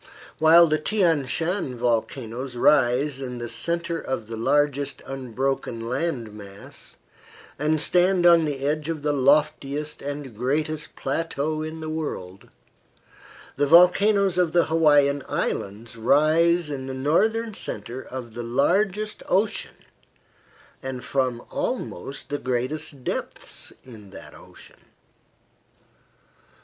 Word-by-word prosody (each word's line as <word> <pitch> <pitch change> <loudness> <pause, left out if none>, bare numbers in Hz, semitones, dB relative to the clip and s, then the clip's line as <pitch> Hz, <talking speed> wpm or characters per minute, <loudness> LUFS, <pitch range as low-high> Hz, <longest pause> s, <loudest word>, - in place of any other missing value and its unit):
While 165 +2 +7
the 155 -1 +1
Thian 165 -6 +2
Shan 165 -3 -2
volcanoes 120 +1 -2
rise 135 +1 +3
in 125 -2 -5
the 120 0 -5
centre 170 +5 -2
of 130 -7 -4
the 115 +1 -7
largest 145 +3 0
unbroken 130 -2 -3
land 130 -4 -2
mass, 100 -1 -11 0.6
and 155 +1 +1
stand 180 +3 +3
on 170 -2 +6
the 140 -2 -3
edge 150 +1 -1
of 155 -3 -4
the 150 -1 +1
loftiest 145 +1 +1
and 140 -4 -6
greatest 150 +6 -2
plateau 155 +1 -2
in 155 +1 -6
the 155 - -5
world, 145 - -5 1.1
the 145 - +2
volcanoes 180 +3 +5
of 175 -3 +2
the 175 -1 +4
Hawaiian 145 -3 +3
Islands 105 +4 -3
rise 155 +7 +3
in 135 -2 -5
the 130 - -5
northern 220 +12 +1
centre 120 - -5
of 125 -4 -8
the 120 - -5
largest 190 - 0
ocean 200 +3 -1 1.0
and 130 -2 -6
from 130 -3 -1
almost 135 +10 -4
the 145 - -2
greatest 130 +2 -3
depths - - -4
in 110 -6 -13
that - - -11
ocean. - - -16
145 Hz, 120 wpm, -24 LUFS, 125-165 Hz, 1.1 s, While